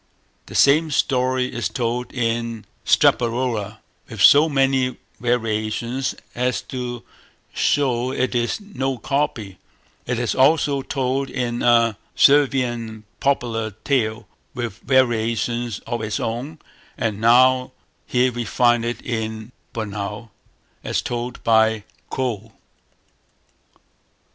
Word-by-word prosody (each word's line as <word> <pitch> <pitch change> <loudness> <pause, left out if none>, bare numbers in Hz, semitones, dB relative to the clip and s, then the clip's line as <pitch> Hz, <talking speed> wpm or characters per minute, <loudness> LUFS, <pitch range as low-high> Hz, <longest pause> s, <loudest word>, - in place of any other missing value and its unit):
The - - -10
same 155 +3 +5
story 130 -2 +1
is 120 - -2
told 120 0 -2
in 115 -2 -2 0.2
Straparola 115 -3 +2 0.3
with 115 - -8
so 145 +10 +7
many 135 -2 +1 0.2
variations 120 +2 -1 0.2
as 125 0 -1
to 120 -2 -4 0.5
show 130 -4 +1
it 130 -1 -1
is 120 - 0
no 135 -11 -3
copy; 120 -10 -2 0.5
it 125 0 -1
is 120 -3 -1
also 140 0 +3
told 135 0 -2
in 120 -1 -2
a 115 -3 +3 0.2
Servian 125 -6 +2 0.2
popular 120 -5 0
tale, 110 -6 0 0.3
with 115 -3 -4
variations 120 -2 +1
of 120 -1 -3
its 105 -1 -2
own; 125 +8 -4 0.4
and 110 -2 -2
now 125 +2 +5 0.4
here 125 0 +2
we 120 0 -3
find 120 +1 +2
it 120 +1 -4
in 110 -1 -4 0.2
Bornou, 105 0 -5 0.5
as - - -1
told 120 +1 -4
by 110 -1 +3 0.3
Kölle. 115 -4 -3
120 Hz, 110 wpm, -21 LUFS, 115-130 Hz, 0.5 s, so